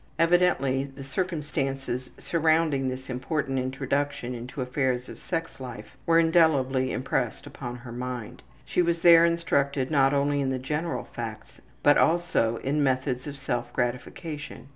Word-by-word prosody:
Evidently 165 -6 +3
the 135 0 -10
circumstances 135 -5 -2
surrounding 160 -4 +2
this 130 +1 -6
important 135 +1 -2
introduction 135 0 -2
into 125 +4 -7
affairs 125 -1 -1
of - - -10
sex 165 -4 -4
life 125 0 -8
were 165 0 +5
indelibly 150 -6 +3
impressed 125 -2 -2
upon 120 -2 -7
her 120 0 -10
mind. 125 -2 -5 0.2
She - - +1
was 170 -1 +1
there 170 -1 +8
instructed 140 -5 +1
not 135 -2 +4
only 145 0 +1
in 135 - 0
the 130 - 0
general 150 +6 -2
facts, 115 -2 -8 0.2
but 145 - +6
also 165 -9 +2
in 145 +3 +1
methods 130 -1 0
of 145 -1 -6
self 120 -3 -3
gratification. 135 +4 -4
135 Hz, 140 wpm, -27 LUFS, 130-160 Hz, 0.2 s, there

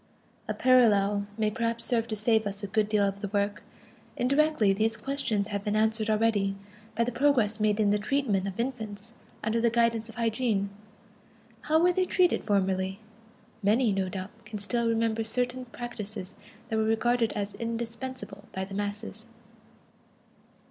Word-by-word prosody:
A - - -2
parallel 205 -5 +4
may 215 -1 +1
perhaps 230 0 -1
serve 230 -2 +1
to 220 - -2
save 220 0 +2
us 200 +1 -5
a - - -2
good 210 +1 +1
deal 210 -1 +3
of 195 0 -4
the 205 - -2
work. 205 0 -1 0.6
Indirectly, 275 -5 +3
these 220 +3 +1
questions 230 -7 -1
have 200 -1 -3
been 210 0 -1
answered 220 0 +2
already 210 -3 +2 0.4
by 235 - +2
the 240 - -1
progress 240 -5 +2
made 210 0 +2
in 205 -2 +3
the 210 - +2
treatment 210 -4 0
of 195 +2 -6
infants 225 -3 -4 0.3
under 220 +1 +1
the 235 - +4
guidance 230 -1 +1
of 225 - -11
hygiene. 225 -4 0 0.9
How 310 +1 +3
were 355 +2 +4
they 370 +1 +2
treated 360 -1 +2
formerly? 190 -1 0 0.6
Many, 215 +2 +3
no 190 -1 -1
doubt, 190 +1 -6
can 215 0 -7
still 235 +3 -1
remember 225 0 +1
certain 250 +3 -1
practises 215 -5 -7 0.4
that 220 - 0
were 220 - +2
regarded 230 +1 +2
as 205 -1 -3
indispensable 230 -2 -5
by 190 0 -2
the 195 - -10
masses. 205 +2 -5
220 Hz, 160 wpm, -28 LUFS, 205-235 Hz, 0.9 s, parallel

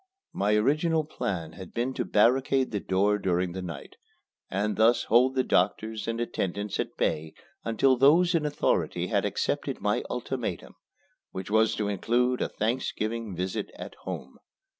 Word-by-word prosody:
My 105 +2 +2
original 155 +8 +2
plan 90 - -4
had 95 -1 -11
been 125 +3 -1
to - - -2
barricade 130 +4 +3
the 105 - -1
door 100 +2 +1
during 90 -1 0
the 95 +2 -5
night, 85 -6 -8 0.5
and 105 +2 -1
thus 115 +2 +4
hold 125 +4 +4
the 130 - +2
doctors 110 -2 0
and 115 0 -2
attendants 100 -3 -2
at - - -3
bay 80 0 -1 0.3
until 125 +3 +3
those 165 +7 +5
in 165 -3 +2
authority 150 -1 0
had - - +1
accepted - - -1
my - - +1
ultimatum, - - -4 0.6
which 95 +2 -7
was 110 +1 +3
to 105 - -1
include 120 +5 +1
a - - 0
Thanksgiving 115 -2 -2
visit 90 +1 -3
at - - -8
home. - - -7
110 Hz, 155 wpm, -27 LUFS, 95-130 Hz, 0.6 s, those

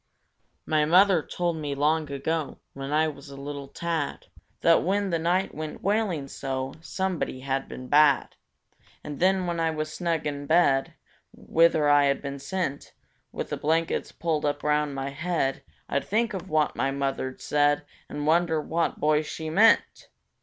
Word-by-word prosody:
My 155 -1 +2
mother 180 +2 +5
told 175 +1 -2
me 145 -2 -3
long 150 +2 +1
ago 145 +1 -2 0.2
(When 135 +1 -6
I 155 +1 +3
was 140 -2 -8
a 140 - -10
little 140 0 -6
tad) 165 0 -3 0.4
That 165 0 +5
when 195 +1 0
the 165 - +1
night 180 +4 0
went 155 0 -6
wailing 195 -8 0
so, 135 -1 -4
Somebody 180 -7 -3
had 135 0 -2
been 130 - -8
bad; 145 0 +4 0.7
And 145 -2 -7
then, 185 0 +3
when 170 -1 -2
I 165 0 +2
was 155 -1 -3
snug 170 -3 -1
in 145 -1 -4
bed, 140 -5 +3 0.4
Whither 160 -2 +2
I 145 0 +5
had 140 0 +1
been 140 -1 -6
sent, 145 -1 -4 0.4
With - - -5
the - - -1
blankets 160 +2 0
pulled 160 -3 -2
up 145 0 -1
round 150 -1 +1
my 135 0 -3
head, 155 -2 -1 0.3
I'd 140 - -1
think 220 +2 0
of 190 -1 -6
what 155 -1 +1
my 135 - 0
mother'd 135 -1 -3
said, 145 0 +2 0.3
And 145 - -4
wonder 160 0 +3
what 165 +2 -1
boy 150 0 +3
she 155 +1 -6
meant! 220 +7 +3
155 Hz, 165 wpm, -26 LUFS, 140-170 Hz, 0.7 s, mother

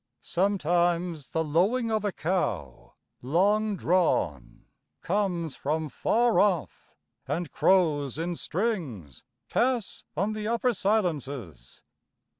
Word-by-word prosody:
Sometimes 175 -4 0
the 160 - 0
lowing 200 +10 +1
of 215 -1 0
a 205 - 0
cow, 115 - -3 0.3
long 205 - +2
drawn, 85 - 0 0.4
Comes 175 -5 -1
from 155 +2 -2
far 235 - +2
off; 190 -7 0 0.3
and 170 -2 -2
crows 150 -8 +2
in 170 +2 -2
strings 160 - -3 0.2
Pass 240 -4 0
on 200 +5 0
the 215 0 -4
upper 235 +2 +1
silences. 145 - -2
175 Hz, 100 wpm, -27 LUFS, 150-210 Hz, 0.4 s, long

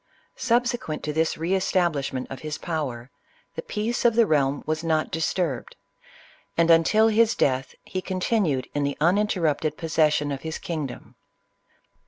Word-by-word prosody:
Subsequent 240 -8 0
to 150 - -2
this 160 +1 0
re 165 +4 -1
establishment 170 -9 0
of 135 - -6
his 155 -1 -5
power, 135 -7 -4 0.4
the - - -5
peace 220 +3 -2
of 235 -2 +4
the 230 -1 +5
realm 145 -4 +1
was 155 +1 -2
not 160 -1 0
disturbed; 160 -4 -2 0.8
and 170 0 +4
until 215 +7 +5
his 225 +1 +3
death, 130 -1 0
he 185 - -4
continued 185 - 0
in 145 - -1
the 140 0 -1
uninterrupted 165 -4 +1
pos 165 -1 -5
session 150 -2 +3
of 135 -1 -4
his 160 0 -4
kingdom. 155 -6 -6
160 Hz, 150 wpm, -25 LUFS, 145-190 Hz, 0.8 s, the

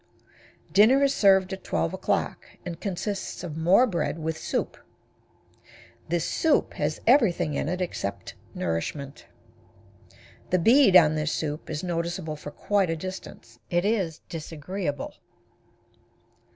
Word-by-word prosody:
Dinner 240 +8 +6
is 275 0 +3
served 190 -1 +4
at 190 - -7
12 80 0 -1
o'clock, - - -1 0.2
and 170 -2 -6
consists 200 0 -4
of 165 -4 -5
more 175 +9 +5
bread 175 -7 -2
with 160 0 -3
soup. - - -3 1.3
This 170 -1 0
soup 320 -2 +1
has - - -2
everything 190 - +3
in 140 - -1
it 180 +1 -2
except 100 - -4 0.2
nourishment. 135 - -4 1.2
The 185 - +3
bead 230 +3 +5
on 155 -4 +7
this 155 0 -1
soup 150 0 -3
is 155 +1 -4
noticeable 170 -2 -3
for 150 0 -8
quite 195 +3 0
a 165 - 0
distance. 160 -9 -9
It 175 +2 +1
is 190 -7 0
disagreeable. 160 -1 -5
175 Hz, 125 wpm, -26 LUFS, 155-195 Hz, 1.3 s, on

